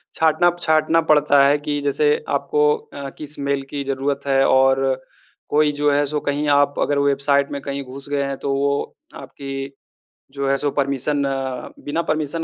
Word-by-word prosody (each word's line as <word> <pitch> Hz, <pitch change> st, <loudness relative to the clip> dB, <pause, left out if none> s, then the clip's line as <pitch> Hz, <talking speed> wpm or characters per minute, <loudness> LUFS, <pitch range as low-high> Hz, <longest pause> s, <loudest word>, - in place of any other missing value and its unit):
छाँटना 160 Hz, +2 st, +3 dB
छाँटना 160 Hz, 0 st, +3 dB
पड़ता 145 Hz, -2 st, +5 dB
है 140 Hz, +1 st, +4 dB
कि 145 Hz, 0 st, -3 dB
जैसे 150 Hz, +1 st, +1 dB
आपको 150 Hz, +1 st, +2 dB
अ, 140 Hz, -1 st, -9 dB
किस 150 Hz, -1 st, -8 dB
मेल 140 Hz, 0 st, -1 dB
की 145 Hz, -, -3 dB
ज़रूरत 140 Hz, +1 st, -2 dB
है 135 Hz, -1 st, +3 dB
और 135 Hz, 0 st, +4 dB, 0.7 s
कोई 150 Hz, 0 st, +2 dB
जो 145 Hz, 0 st, +1 dB
है 145 Hz, +1 st, +2 dB
सो 150 Hz, +1 st, -2 dB
कहीं 145 Hz, +1 st, -2 dB
आप 145 Hz, 0 st, +3 dB
अगर 145 Hz, -1 st, +1 dB
वेबसाइट 140 Hz, 0 st, +2 dB
में 140 Hz, -, -4 dB
कहीं 140 Hz, 0 st, -4 dB
घुस 135 Hz, +2 st, -9 dB
गए 145 Hz, -1 st, 0 dB
हैं, 140 Hz, 0 st, -3 dB
तो 140 Hz, +1 st, -2 dB
वो 140 Hz, +1 st, -1 dB, 0.2 s
आपकी 135 Hz, 0 st, -7 dB, 0.6 s
जो 140 Hz, 0 st, -3 dB
है 140 Hz, -, +3 dB
सो 145 Hz, +1 st, -1 dB
परमिशन 140 Hz, +1 st, -1 dB, 0.6 s
बिना 150 Hz, +3 st, -1 dB
परमिशन 155 Hz, +1 st, -1 dB
140 Hz, 175 wpm, -21 LUFS, 140-150 Hz, 0.7 s, पड़ता